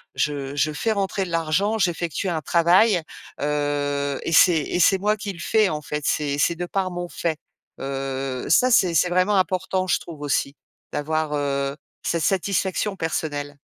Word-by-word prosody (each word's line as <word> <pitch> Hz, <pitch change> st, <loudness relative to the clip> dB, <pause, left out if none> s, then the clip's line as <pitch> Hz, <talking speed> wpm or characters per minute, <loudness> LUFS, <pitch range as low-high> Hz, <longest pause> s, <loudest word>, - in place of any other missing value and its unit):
je 140 Hz, -2 st, -2 dB
je 155 Hz, +1 st, +2 dB
fais 220 Hz, +9 st, -1 dB
rentrer 195 Hz, -1 st, -1 dB
de 175 Hz, -, -8 dB
l'argent, 165 Hz, +7 st, +1 dB
j'effectue 175 Hz, -1 st, -1 dB
un 160 Hz, -2 st, -2 dB
travail, 175 Hz, +5 st, +4 dB, 0.4 s
heu, 145 Hz, -1 st, -1 dB
et 165 Hz, -, -2 dB
c'est 165 Hz, 0 st, +6 dB
et 175 Hz, -, -2 dB
c'est 195 Hz, -, +5 dB
moi 210 Hz, +2 st, +2 dB
qui 205 Hz, -1 st, -4 dB
le 170 Hz, -, -13 dB
fais, 215 Hz, +2 st, +2 dB
en 150 Hz, -1 st, -3 dB
fait, 150 Hz, 0 st, -4 dB
c'est 145 Hz, -2 st, 0 dB
c'est 170 Hz, -, +2 dB
de 175 Hz, +1 st, -4 dB
par 185 Hz, 0 st, -2 dB
mon 175 Hz, 0 st, -4 dB
fait». 160 Hz, -3 st, -2 dB, 0.4 s
Heu 135 Hz, -1 st, -4 dB
ça, 255 Hz, 0 st, +4 dB
c'est 185 Hz, -6 st, +4 dB
c'est 180 Hz, +4 st, +3 dB
vraiment 185 Hz, +3 st, +2 dB
important, 185 Hz, 0 st, 0 dB
je -, -, +2 dB
trouve 155 Hz, -4 st, -10 dB
aussi 140 Hz, 0 st, -1 dB, 0.4 s
d'avoir, 155 Hz, 0 st, -1 dB
heu, 140 Hz, -1 st, -1 dB, 0.3 s
cette 170 Hz, -2 st, -1 dB
satisfaction 195 Hz, +1 st, 0 dB
personnelle. 145 Hz, -3 st, -3 dB
165 Hz, 175 wpm, -23 LUFS, 145-185 Hz, 0.4 s, c'est